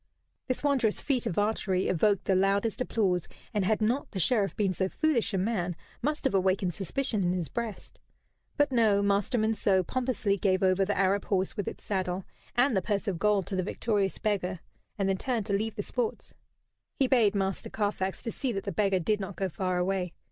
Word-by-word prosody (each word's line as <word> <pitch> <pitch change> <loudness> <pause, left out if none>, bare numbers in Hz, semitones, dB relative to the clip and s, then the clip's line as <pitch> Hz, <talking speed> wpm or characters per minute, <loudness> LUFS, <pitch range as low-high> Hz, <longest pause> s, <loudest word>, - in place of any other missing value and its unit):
This 255 +1 -1
wondrous 265 -7 +2
feat 260 -4 0
of 170 - -3
archery 205 -3 +1
evoked 200 +3 +2
the 195 - +2
loudest 200 +5 +2
applause, 190 -8 0 0.3
and 205 -2 +1
had 215 +3 +1
not 245 +6 0
the 195 - -5
Sheriff 205 +1 +2
been 195 -3 +1
so 190 +2 -1
foolish 300 -5 +1
a 195 - 0
man, 185 -3 -1 0.3
must 300 +4 -1
have - - +1
awakened 190 -1 +1
suspicion 205 - -1
in 175 0 +1
his 175 -3 -2
breast. 230 -4 -5 0.6
But, 290 -1 +3
no 215 -5 +3
Master 200 +4 +1
Monceux 215 -4 +2
pompously 245 -5 0
gave 190 -1 +1
over 190 +1 +3
the 205 - -1
Arab 195 +1 +2
horse 190 -2 0
with 205 -4 -3
its - - -6
saddle, 185 -2 -2 0.3
and 245 0 +3
the 190 - +2
purse 205 +2 -2
of 185 -4 -1
gold 205 -2 +2
to 195 - -4
the 185 - +1
victorious 200 0 -1
beggar; 190 -5 -1 0.4
and 195 -2 0
then 195 0 +1
turned 235 -2 -1
to 205 - -2
leave 215 +2 -1
the - - -3
sports. 465 -3 -3 0.6
He 275 - +2
bade 235 -6 +3
Master 195 -1 -1
Carfax 205 -3 -2
to 230 - -2
see 265 +1 -2
that 195 - -3
the 200 - -3
beggar 195 -2 +2
did 205 +4 0
not 195 -1 -5
go 190 +2 -1
far 185 +1 -1
away. 180 -1 -1
200 Hz, 205 wpm, -29 LUFS, 190-225 Hz, 0.6 s, But